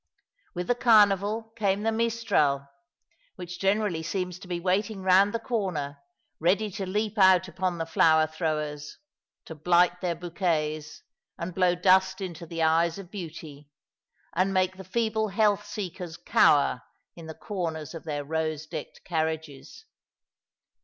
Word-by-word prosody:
With 180 Hz, 0 st, -3 dB
the 245 Hz, -, +2 dB
Carnival 220 Hz, -1 st, +3 dB
came 200 Hz, -2 st, 0 dB
the 225 Hz, -, +1 dB
mistral, 220 Hz, -12 st, +1 dB, 0.7 s
which 180 Hz, -1 st, -8 dB
generally 195 Hz, -3 st, +1 dB
seems 180 Hz, +1 st, -3 dB
to 190 Hz, -, -12 dB
be 175 Hz, -1 st, -3 dB
waiting 195 Hz, +3 st, -1 dB
round 190 Hz, +2 st, +5 dB
the 230 Hz, -, -1 dB
corner 185 Hz, -, -3 dB, 0.4 s
ready 200 Hz, +6 st, +1 dB
to 195 Hz, 0 st, -5 dB
leap 210 Hz, +2 st, -2 dB
out 185 Hz, -1 st, +6 dB
upon 180 Hz, 0 st, -2 dB
the 165 Hz, -, -2 dB
flower 160 Hz, -1 st, +4 dB
throwers, 150 Hz, -2 st, -4 dB, 0.5 s
to -, -, -8 dB
blight 175 Hz, +3 st, +2 dB
their 175 Hz, -2 st, -1 dB
bouquets, 160 Hz, -3 st, -2 dB, 0.3 s
and 170 Hz, +2 st, -5 dB
blow 180 Hz, 0 st, +2 dB
dust 190 Hz, +2 st, +3 dB
into 170 Hz, -3 st, -6 dB
the 165 Hz, 0 st, -2 dB
eyes 165 Hz, +2 st, +2 dB
of 195 Hz, -2 st, -10 dB
beauty, 155 Hz, -6 st, -9 dB, 0.6 s
and 185 Hz, +3 st, +1 dB
make 185 Hz, 0 st, +1 dB
the 190 Hz, -, -8 dB
feeble 220 Hz, +2 st, -1 dB
health 205 Hz, 0 st, +1 dB
seekers 180 Hz, -5 st, -6 dB
cower 140 Hz, -3 st, +3 dB, 0.3 s
in 165 Hz, -2 st, -10 dB
the 160 Hz, -, -8 dB
corners 165 Hz, -7 st, -4 dB
of 165 Hz, -, -8 dB
their 145 Hz, -2 st, -3 dB
rose 155 Hz, 0 st, -2 dB
decked 155 Hz, -1 st, -8 dB
carriages. 160 Hz, -, -4 dB
180 Hz, 145 wpm, -27 LUFS, 160-200 Hz, 0.7 s, out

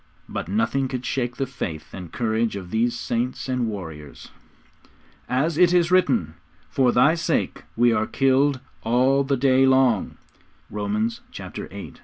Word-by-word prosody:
But -, -, -5 dB
nothing 205 Hz, -12 st, 0 dB
could 125 Hz, -1 st, -5 dB
shake 120 Hz, -2 st, -2 dB
the 135 Hz, -, 0 dB
faith 85 Hz, -, -6 dB
and 90 Hz, -3 st, -8 dB
courage 110 Hz, -1 st, 0 dB
of 90 Hz, -3 st, -7 dB
these 120 Hz, +2 st, +1 dB
saints 120 Hz, +4 st, -2 dB
and 125 Hz, -2 st, 0 dB
warriors. 80 Hz, -9 st, -8 dB, 1.0 s
'As 150 Hz, +6 st, 0 dB
it 180 Hz, -1 st, +5 dB
is 175 Hz, 0 st, +3 dB
written, 125 Hz, -, +2 dB, 0.4 s
For 130 Hz, -2 st, +3 dB
Thy 140 Hz, +6 st, +4 dB
sake 165 Hz, -, -1 dB
we 120 Hz, 0 st, +4 dB
are 110 Hz, -1 st, 0 dB
killed 135 Hz, +1 st, +2 dB, 0.2 s
all 130 Hz, +4 st, +3 dB
the 135 Hz, 0 st, 0 dB
day 135 Hz, 0 st, +4 dB
long.' 130 Hz, -5 st, +2 dB, 0.5 s
(Romans 105 Hz, +2 st, -2 dB
viii. -, -, -8 dB
125 Hz, 145 wpm, -23 LUFS, 110-135 Hz, 1.0 s, it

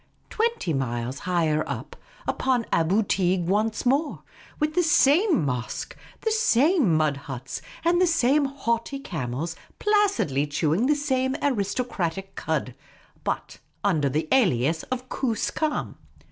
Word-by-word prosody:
twenty 445 Hz, -, 0 dB
miles 125 Hz, -1 st, -2 dB
higher 160 Hz, -3 st, +2 dB
up, -, -, -5 dB, 0.3 s
upon 250 Hz, -3 st, +1 dB
Aboo 185 Hz, +7 st, +3 dB
Teeg 185 Hz, -2 st, +1 dB
once 215 Hz, +5 st, 0 dB
more, 280 Hz, +5 st, +1 dB, 0.4 s
with 305 Hz, 0 st, 0 dB
the 360 Hz, -, +3 dB
same 320 Hz, -, +4 dB
mosque, 125 Hz, -3 st, -3 dB, 0.3 s
the 445 Hz, -, 0 dB
same 305 Hz, -, +3 dB
mud 155 Hz, -2 st, +2 dB
huts, 135 Hz, -2 st, -6 dB, 0.2 s
and 345 Hz, +1 st, +3 dB
the 365 Hz, -, +5 dB
same 295 Hz, -3 st, +3 dB
haughty 270 Hz, -1 st, -2 dB
camels, 160 Hz, -, -4 dB, 0.2 s
placidly 400 Hz, -, +2 dB
chewing 160 Hz, -, +1 dB
the 300 Hz, -, +4 dB
same 265 Hz, -2 st, 0 dB
aristo 250 Hz, -3 st, 0 dB
cratic 195 Hz, -4 st, -4 dB
cud, 150 Hz, -6 st, -2 dB, 0.5 s
but -, -, -3 dB, 0.2 s
under 160 Hz, -9 st, +2 dB
the 155 Hz, +4 st, -1 dB
alias 165 Hz, -, +3 dB
of 255 Hz, 0 st, -3 dB
Koos 235 Hz, -4 st, -1 dB
kam. 310 Hz, -2 st, -2 dB
215 Hz, 130 wpm, -25 LUFS, -, 0.5 s, the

